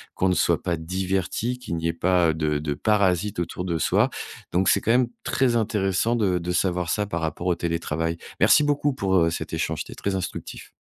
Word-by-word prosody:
qu'on 95 - +1
ne - - +3
soit - - +2
pas 85 - -1
diverti, 95 +7 -2
qu'il 125 -9 -5
n'y 80 0 -1
ait 85 - 0
pas 85 -1 +2
de 75 -2 0
de 75 -1 -2
parasites 100 +1 +1
autour 90 +1 -3
de 85 -3 -1
soi. 80 - +2 0.4
Donc, 95 +2 +1
c'est - - +4
quand 115 - +1
même 125 +1 +4 0.2
très 130 -3 +1
intéressant 105 0 +1
de 95 -5 +1
de 90 +1 -3
savoir 90 -1 0
ça 105 +4 0
par 85 -4 -3
rapport 80 +3 -3
au 90 - +2
télétravail. 85 -1 -2 0.2
Merci - - +6
beaucoup 145 0 +1
pour, 95 -6 0
heu, 85 -2 +4
cet 80 - -5
échange. - - -1
C'était - - -11
très 100 -1 -2
instructif. 95 - -6
90 Hz, 210 wpm, -24 LUFS, 85-105 Hz, 0.4 s, Merci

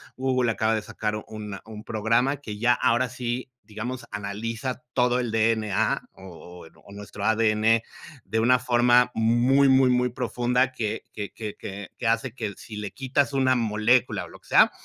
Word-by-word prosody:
Google 130 -2 +1
acaba 110 0 +1
de 110 - -1
sacar 105 0 -4
una 105 -2 -7
un 110 -1 -9
programa 115 +6 +1
que 105 -7 -8
ya 120 +3 +3
ahora 120 +1 +1
sí, 125 +1 -4 0.2
digamos, 120 +4 -6
analiza 115 +5 -4
todo 125 0 +2
el 120 -3 -2
D-N-A, 110 -2 +1
o 90 -2 -12 0.3
o - - -14
nuestro 100 0 -7
A-D-N 110 0 +3 0.4
de 110 +4 -2
una 125 +3 +4
forma 125 0 +3
muy, 120 +5 +3
muy, 130 -1 +5
muy 125 0 +2
profunda, 125 +1 0
que 110 -5 -3
que 105 -2 -5
que 105 -2 -6 0.4
que 120 - -2
hace 115 +1 0
que, 110 -5 -4
si 110 - -9
le 105 -1 -5
quitas 135 +1 0
una 130 -1 +3
molécula 115 +1 +1
o - - -13
lo - - -14
que - - -24
sea, - - +6
115 Hz, 170 wpm, -25 LUFS, 110-125 Hz, 0.4 s, sea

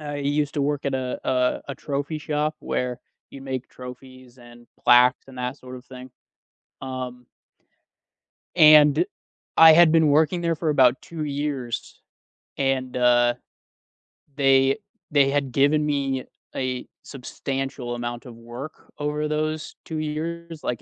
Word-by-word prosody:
I 145 -1 -5
used 145 +1 -1
to 145 - 0
work 145 0 -1
at 140 - -1
a 130 -1 -3 0.5
a 140 - -4
trophy 145 +2 -4
shop 150 +1 -2
where 125 0 -3 0.3
you 135 - -11
make 130 -1 -5
trophies 130 0 -12
and 120 0 -16 0.2
plaques 125 +1 +5
and 130 - -13
that 125 +1 -3
sort 130 0 -10
of 125 - -13
thing, 130 0 -11 0.7
um 130 -2 -6 1.3
And 150 - +7 0.5
I 160 -1 +9
had 165 0 +6
been 160 -1 +4
working 155 +4 +2
there 170 -1 0
for 155 0 -2
about 130 -4 +4
2 165 -2 -6
years, 140 -4 -4 0.6
and, 130 -2 -1
uh, 120 -1 +4 1.0
they 135 -1 +3 0.3
they 140 -2 +4
had 140 -2 -1
given 145 +4 +2
me 135 -3 -1 0.3
a 130 -1 -3 0.2
substantial 135 -1 -5
amount 120 0 -5
of 120 -2 -10
work 120 +6 -10
over 150 +1 -2
those 155 +1 -3
2 160 - -5
years, 165 +1 -5
like, 120 -2 -3
135 Hz, 140 wpm, -24 LUFS, 125-150 Hz, 1.3 s, I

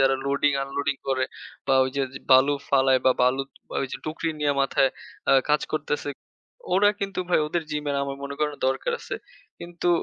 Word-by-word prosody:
যারা 135 0 +5
loading-unloading 140 0 0
করে 130 -1 +2 0.4
বা 135 - +3
ওই 130 - -2
যে - - +2
য - - -6
বালু 130 +2 +7 0.2
ফালায় 135 -1 +4
বা - - +7
বালু 125 +2 +3 0.4
ওইযে 135 - -4
টুকরি 160 +1 -2
নিয়ে 145 -1 +2
মাথায় 135 0 +3 0.4
আ - - +6 0.2
কাজ 150 0 +4
করতেছে। 150 -1 -2 0.6
ওরা 200 +3 +5
কিন্তু 195 -1 -3
ভাই 180 - +4
ওদের 170 +2 -1
জিমের 150 -1 -1
আমার 140 0 -3
মনে 140 0 -5
করে 150 -1 +2
না 145 - -11
দরকার 305 - 0
আছে। - - -5 0.4
কিন্তু 175 0 -4
140 Hz, 180 wpm, -25 LUFS, 135-150 Hz, 0.6 s, বালু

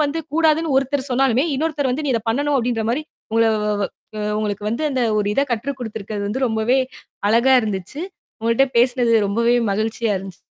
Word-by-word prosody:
வந்து 300 +2 0
கூடாதுன்னு 320 -1 +2
ஒருத்தர் 270 +1 0
சொன்னாலுமே, 260 0 +3
இன்னொருத்தர் 300 -1 -1
வந்து 295 +4 -2
"நீ 275 - 0
இத 230 - +1
பண்ணணும்." 285 +5 +1
அப்படீன்ற 235 -2 0
மாரி, 270 +6 -1 0.3
உங்களை 225 0 +3 0.2
வ - - -1
வ 200 - +1 0.3
அ - - -3 0.2
உங்களுக்கு 205 -1 -3
வந்து 235 +8 -2
அந்த 260 -2 0 0.2
ஒரு 205 - 0
இத - - +3
கற்றுக்குடுத்திருக்கது 220 -5 -4
வந்து 260 +6 -1
ரொம்பவே 225 +3 +1 0.5
அழகா 235 +4 +4
இருந்துச்சு. 205 - -4 0.4
உங்ககிட்ட 230 +4 +3
பேசினது 245 -1 +3
ரொம்பவே 235 +4 +2 0.2
மகிழ்ச்சியா 220 +1 -1
இருந்துச்சு. 190 -2 -9
240 Hz, 170 wpm, -21 LUFS, 220-270 Hz, 0.5 s, அழகா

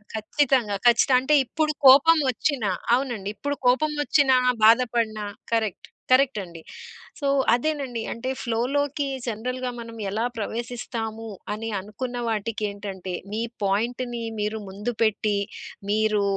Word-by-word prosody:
ఖచ్చితంగా. 235 -1 +1
ఖచ్చితంగా. 250 +2 +5
అంటే 295 +3 +3
ఇప్పుడు 305 +5 0
కోపం 285 +5 +8
వచ్చినా 250 -4 -1 0.3
అవునండి. 240 -7 -3
ఇప్పుడు 285 0 -3
కోపం 300 +5 +3
వచ్చినా 280 -3 +4 0.3
బాధపడినా 230 -2 +3 0.3
కరెక్ట్, 220 -5 -1 0.2
కరెక్ట్ 260 -3 +4
అండి. 170 -2 -11 0.6
సో, 280 - -1 0.3
అదేనండి 260 -3 -1
అంటే 245 +3 -5
ఫ్లో‌లోకి 275 +5 0 0.2
జనరల్‌గా 250 +3 -3
మనం 230 -1 -9
ఎలా 220 +4 -1
ప్రవేశిస్తాము 225 0 -4 0.2
అని 225 +1 -4
అనుకున్న 240 +5 -6
వాటికేంటంటే 200 -4 -4 0.2
మీ 220 - -1 0.2
పాయింట్‌ని 235 +4 -1 0.2
మీరు 210 +1 -2
ముందు 210 +5 -4
పెట్టి 215 -1 +2 0.5
మీరు 215 -1 +2
230 Hz, 115 wpm, -24 LUFS, 215-260 Hz, 0.6 s, కోపం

